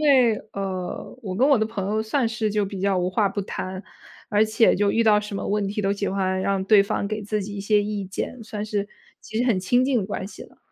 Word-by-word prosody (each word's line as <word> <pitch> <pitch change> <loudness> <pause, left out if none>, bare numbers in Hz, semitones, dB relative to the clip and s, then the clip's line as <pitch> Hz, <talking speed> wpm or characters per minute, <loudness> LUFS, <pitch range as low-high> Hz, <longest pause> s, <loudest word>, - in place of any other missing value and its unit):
为， 260 -7 +5 0.2
呃， 190 +3 -5
我 190 -4 -4
跟 255 +8 +3
我 280 -4 +5
的 220 - +1
朋 215 -3 -4
友 215 +1 +1
算 225 +2 0
是 220 -1 -1
就 210 -1 +1
比 195 -1 -6
较 195 -1 +2
无 180 0 0
话 200 +1 +2
不 200 0 -3
谈， 185 0 -5 0.5
而 210 +1 +4
且 220 +1 +3
就 200 +1 +2
遇 230 - +3
到 215 -2 +5
什 210 -1 -5
么 - - -3
问 205 0 0
题， 210 +2 -2
都 195 0 +2
喜 200 0 -2
欢 190 -1 0
让 195 0 0
对 205 +1 +6
方 200 0 -1
给 215 0 -3
自 210 0 -2
己 205 +1 -6
一 - - -4
些 205 +1 +3
意 205 -1 -3
见， 195 +6 -5
算 210 -1 -5
是 205 -1 -2 0.3
其 220 - -8
实 240 - +2
很 235 -7 +2
亲 245 +7 +2
近 265 -2 +2
的 195 - -2
关 200 - -4
系 200 - -9
了。 - - -20
205 Hz, 280 characters per minute, -24 LUFS, 195-220 Hz, 0.5 s, 对